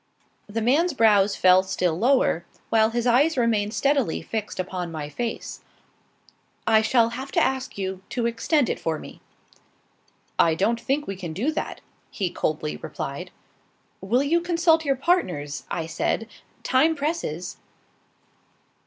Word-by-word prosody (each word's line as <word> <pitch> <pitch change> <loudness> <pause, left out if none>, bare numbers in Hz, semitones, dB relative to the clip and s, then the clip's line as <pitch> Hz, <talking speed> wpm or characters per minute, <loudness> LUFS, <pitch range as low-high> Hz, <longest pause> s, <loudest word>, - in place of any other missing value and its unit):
The 225 +2 -2
man's 295 +7 +2
brows 205 -4 +4
fell 185 0 +6
still 185 -3 -1
lower, 235 -4 +2 0.3
while 220 -1 +4
his 235 +1 -2
eyes 270 +6 +3
remained 220 -3 +1
steadily 275 - +1
fixed 215 +3 -4
upon 180 -2 -3
my 150 -2 -5
face. 235 +8 -5 1.0
"I 220 -1 +5
shall 230 +1 +3
have 260 +4 -6
to - - +3
ask 265 -3 -1
you 190 -1 -4
to 240 -2 -2
extend 235 +4 +1
it - - -2
for 160 -1 -1
me." - - -11 1.2
"I 165 -1 +4
don't 225 +7 +1
think 285 +2 -1
we 195 - -4
can 175 -4 -6
do 245 - 0
that," 315 - -4 0.3
he 185 -4 -2
coldly 150 - -2
replied. - - -6 0.7
"Will 235 +8 +1
you 335 +4 +2
consult 335 -2 +3
your 275 -1 +2
partners?" 185 - -1
I 165 -2 -2
said; 165 +7 -1 0.4
"time 310 +5 +3
presses." 280 - -3
225 Hz, 145 wpm, -24 LUFS, 185-275 Hz, 1.2 s, fell